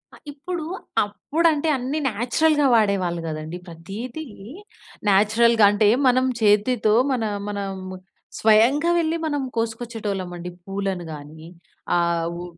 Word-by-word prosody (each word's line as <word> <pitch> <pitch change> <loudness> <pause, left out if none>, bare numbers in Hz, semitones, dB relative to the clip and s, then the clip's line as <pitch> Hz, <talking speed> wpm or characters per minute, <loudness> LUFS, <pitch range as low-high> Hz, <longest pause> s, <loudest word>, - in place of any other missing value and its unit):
ఆ! - - -15
ఇప్పుడు 335 +4 -5 0.4
అప్పుడు 285 - -1
అంటే 300 +1 -2
అన్ని 260 +5 -3
నేచురల్‌గా 270 +7 +1
వాడేవాళ్ళు 195 -6 +1
కదండీ 155 +2 -5
ప్రతీది 200 - -7 0.9
నేచురల్‌గా 220 +3 +4
అంటే 205 0 +2 0.2
మనం 255 +1 +3 0.2
చేతితో 210 +1 +3 0.2
మన 250 -3 0 0.3
మనం 200 -1 -3 0.7
స్వయంగా 235 +9 +4
వెళ్లి 325 -1 +1
మనం 290 -2 -1
కోసుకొచ్చేటోళ్ళం 225 -4 -3
అండి 175 +1 -6 0.2
పూలను 195 -2 -3
గాని 150 +2 -11 0.5
ఆహ్, 170 -1 +1
వు 175 +1 -6
215 Hz, 115 wpm, -23 LUFS, 190-255 Hz, 0.9 s, నేచురల్‌గా